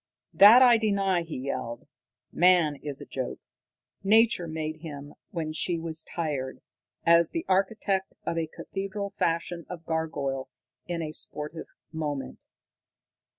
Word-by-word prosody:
"That 225 +6 +9
I 240 -2 +6
deny," 195 -4 +1
he 165 -4 -6
yelled. 125 -3 -4 0.5
"Man 175 -4 +4
is 145 -1 -6
a - - -7
joke. 130 -2 -4 0.7
Nature 220 -3 +4
made 155 -1 -4
him 145 -3 -9 0.2
when 160 -5 -4
she 170 +2 0
was 160 -1 -3
tired, 150 -6 -4 0.5
as 170 0 +6
the 330 - -4
architect 195 0 0
of - - -1
a 165 -1 -1
cathedral 195 +4 -5
fashions 170 -2 -2
a 180 - -5
gargoyle 160 -5 -3 0.4
in 170 -1 -2
a 155 - -4
sportive 155 +1 -4 0.2
moment. 150 -4 -4
165 Hz, 130 wpm, -27 LUFS, 155-190 Hz, 0.7 s, That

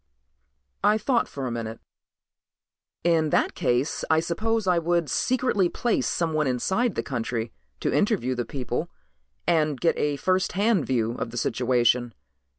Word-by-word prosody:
I 210 +1 +4
thought 235 +3 +1
for 135 -2 -5
a 125 - -2
minute. 115 -1 -5 1.2
"In 165 -2 +3
that - - +2
case 130 -2 0
I 160 0 +4
suppose 215 +7 -1
I 180 -2 +3
would 170 -3 0
secretly 245 -8 +1
place 240 +5 0
someone 155 -3 0
inside 190 - 0
the - - -1
country 115 -3 -3 0.3
to - - 0
interview 200 - +1
the 120 -1 -2
people 130 +6 -4 0.6
and 155 -5 +2
get 165 - +2
a 145 -1 +1
first 185 +6 0
hand 200 -3 +2
view 115 -3 +1
of - - -3
the 120 - -8
situation. 120 0 +1
155 Hz, 150 wpm, -25 LUFS, 125-190 Hz, 1.2 s, I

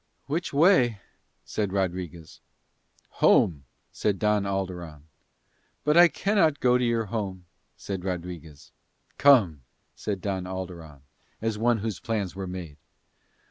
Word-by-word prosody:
"Which 165 +5 -2
way?" 140 - +4 0.5
said 105 -3 -2
Rodriguez. 90 -4 -4 0.8
"Home," 70 -6 +4 0.3
said 105 -2 -1
Don 105 -1 +1
Alderon. 90 -6 -4 0.8
"But 150 0 +2
I 175 +1 +9
cannot 170 -5 +1
go 125 0 +3
to - - 0
your 115 -2 +1
home," 95 -4 -4 0.3
said 95 -3 -5
Rodriguez. 85 -5 -6 0.5
"Come," 105 - +5 0.3
said 100 -2 -4
Don 95 0 -3
Alderon, 90 -6 -7 0.4
as 110 -1 -2
one 120 +1 +3
whose 105 -4 -4
plans 105 -6 -3
were 95 -1 -5
made. 90 -5 -7
95 Hz, 120 wpm, -26 LUFS, 90-115 Hz, 0.8 s, I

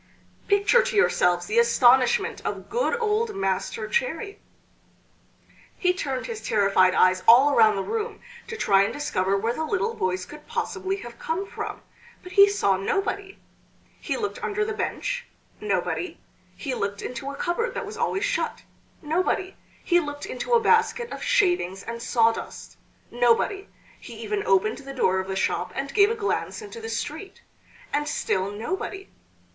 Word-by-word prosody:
Picture 405 +4 +4
to 485 -1 -3
yourselves 175 - +3
the 215 +5 +2
astonishment 240 +2 +4
of - - -5
good 475 0 0
old 445 0 0
Master 195 +3 -2
Cherry! 475 -4 -2 1.4
He 360 -1 +2
turned 270 -8 -3
his 460 -3 -6
terrified 195 -3 +3
eyes 185 0 +4
all 265 +5 +7
around 220 -4 +5
the 195 - -2
room 450 - -3 0.3
to 460 - -6
try 195 - +4
and 200 - +1
discover 195 -9 0
where 225 +4 -1
the 315 - -3
little 380 +8 -1
voice 185 - -2
could 300 0 -13
possibly 385 -5 -2
have 235 0 -11
come 340 +5 -2
from, - - -6 0.4
but 365 - -10
he 400 0 +7
saw 200 - +1
nobody! 390 - -2 0.6
He - - -3
looked 450 +1 -4
under 425 -1 -1
the 440 - -3
bench - - -3 0.3
nobody; 365 - -2 0.4
he 275 -4 -4
looked 200 -4 -3
into 250 +2 -5
a 280 - -6
cupboard 355 +11 -2
that 485 - -3
was 420 - -8
always 390 - -1
shut - - -2 0.4
nobody; 370 +4 -1 0.3
he 350 -1 +4
looked 290 -3 -5
into 255 - -3
a 475 - +7
basket 460 +1 +2
of - - -6
shavings 275 - +1
and 235 0 -6
sawdust 230 -1 0 0.4
nobody; 245 - +2 0.3
he 235 - -11
even 210 -1 -2
opened 195 +3 +2
the 275 0 -9
door 190 -7 +2
of 190 - -4
the 190 - -3
shop 190 - -1
and 275 +1 -4
gave 405 0 +5
a 455 - -1
glance 425 -2 -2
into 450 +1 -9
the 450 - -6
street 395 -3 -5 0.5
and 295 +1 0
still 190 -7 -1
nobody. 380 - -5
300 Hz, 160 wpm, -25 LUFS, -, 1.4 s, all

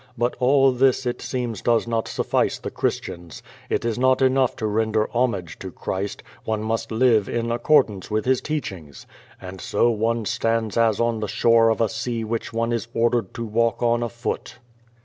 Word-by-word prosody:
I>ut 120 +1 +1
all 135 +1 +4
this, 130 +1 +2
it 120 - -2
seems, 120 -5 -3
does 115 -1 +2
not 115 -1 -1
sullice - - 0
the - - -6
Christians. 85 -1 -4 0.3
It - - -1
is 115 0 -1
not 130 0 +3
enough 130 -1 +2
to 110 - -4
render 110 0 +1
homage 110 -9 -1
to 95 - -6
Christ, 100 +3 -4 0.2
one 110 -1 -2
must 110 +1 -2
live 110 -3 +3
in 115 0 -1
accordance 120 -5 +2
with 110 0 -1
His 130 0 +2
teachings. 95 - -5 0.3
And 95 -1 -9
so 120 +8 +2
one 115 +1 -1
stands 115 -2 -1
as 115 -3 +2
on 115 -1 +1
the 105 - -2
shore 115 +2 +4
of 110 - 0
a 115 - +3
sea 115 +2 -3
which 110 +1 -3
one 115 +1 -1
is 115 0 -2
ordered 120 0 +1
to 115 - -4
walk 115 +2 0
on 120 0 +2
afoot. 120 0 -4
115 Hz, 185 wpm, -23 LUFS, 110-120 Hz, 0.3 s, all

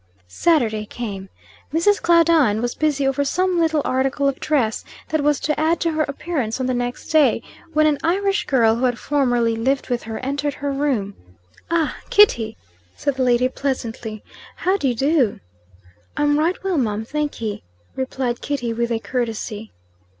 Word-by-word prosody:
Saturday 220 - +1
came. 205 -4 -6 0.4
Mrs. 340 +7 +2
Claudine 330 -10 +4
was 240 +1 -1
busy 295 -3 0
over 270 +1 +1
some 365 +5 +1
little 320 -3 +2
article 270 +2 +1
of 275 -1 -1
dress 250 -8 0 0.3
that 315 0 +1
was 295 -1 +2
to 300 -1 -1
add 320 +2 +2
to 335 - 0
her 310 0 0
appearance 280 -5 -2
on 260 - -1
the 255 - 0
next 245 0 -3
day, 285 -7 +3 0.3
when 310 0 +4
an 300 -2 +2
Irish 395 +4 +1
girl, 230 -5 +4
who 255 - +1
had 245 -1 +1
formerly 245 -6 +1
lived 265 +5 0
with 245 -1 0
her, 220 0 -6
entered 280 +2 -2
her 285 0 -3
room. 270 -8 -1 0.6
"Ah! 330 -2 0
Kitty!" 235 - +4 0.4
said 285 - -1
the 260 0 -1
lady 250 0 +3
pleasantly. 235 -5 -4 0.3
"How 375 +2 +1
do 330 -9 0
you 245 - 0
do?" 270 -2 +2 0.8
"I'm 295 0 +2
right 340 +4 +1
well, 375 -5 0
mum, 220 -3 -1
thankee," 275 -6 -3 0.3
replied 260 -2 -2
Kitty, 245 -5 -2
with 235 +1 -1
a 230 - +1
courtesy. 225 -3 -4
270 Hz, 165 wpm, -21 LUFS, 235-305 Hz, 0.8 s, Claudine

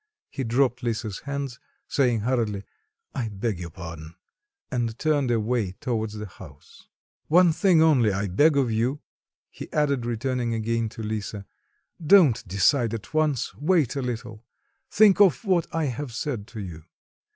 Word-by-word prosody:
He 135 - -4
dropped 125 +1 +1
Lisa's 110 -4 -3
hands, 140 -2 -5 0.3
saying 125 -5 +1
hurriedly, 110 -4 -1 0.5
"I 120 -4 -2
beg 100 -1 -3
your 85 -1 -6
pardon," 80 -1 -9 0.6
and 120 -2 -2
turned 145 -4 +1
away 115 -4 0
towards 110 -1 -3
the 105 0 -5
house. 75 -7 -15 0.4
"One 175 +1 +5
thing 175 -2 +4
only 130 -9 +4
I 100 +1 -1
beg 145 - +3
of 130 -4 +2
you," 120 +6 0 0.5
he - - -10
added, 140 -5 0
returning 120 0 -1
again 115 0 -1
to 115 0 -8
Lisa; 105 -1 -4 0.6
"don't 155 - +5
decide 115 +5 +2
at 105 +3 -9
once, 155 -5 0
wait 155 -4 +1
a 140 - -1
little, 115 -3 -5 0.5
think 205 -1 +5
of 195 - +4
what 180 -4 +2
I 165 -1 -1
have 130 -1 -4
said 115 -6 -3
to 110 - -9
you. 85 -6 -8
120 Hz, 150 wpm, -25 LUFS, 110-140 Hz, 0.6 s, One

